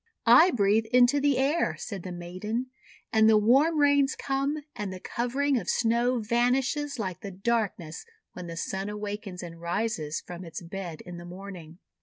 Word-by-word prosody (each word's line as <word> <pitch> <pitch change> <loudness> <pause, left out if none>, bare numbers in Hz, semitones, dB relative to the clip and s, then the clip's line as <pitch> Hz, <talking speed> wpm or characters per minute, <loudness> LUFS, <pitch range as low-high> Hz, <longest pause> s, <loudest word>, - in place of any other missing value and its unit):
"I 360 - +8
breathe 220 - +2
into 250 +4 +4
the 285 -1 +2
air," 280 +5 +1
said 200 -6 -6
the 185 - -7
maiden, 185 +8 -4 0.4
"and 220 0 +6
the 220 - +6
warm 270 +10 +4
rains 285 -1 +4
come, 280 +2 -2
and 205 -2 -4
the 185 - -7
covering 260 +6 0
of - - -6
Snow 240 +2 +2
vanishes 250 +5 0
like 190 -6 -4
the 200 - -6
darkness 195 -5 -2 0.3
when 180 -1 -8
the 165 0 -7
Sun 195 +4 -3
awakens 205 -3 -5
and 165 -1 -9
rises 170 -4 -2
from 175 +1 -9
its 165 -2 -7
bed 170 -2 -6
in 175 -1 -9
the 175 - -9
morning." 175 -3 -9
215 Hz, 170 wpm, -27 LUFS, 180-255 Hz, 0.4 s, I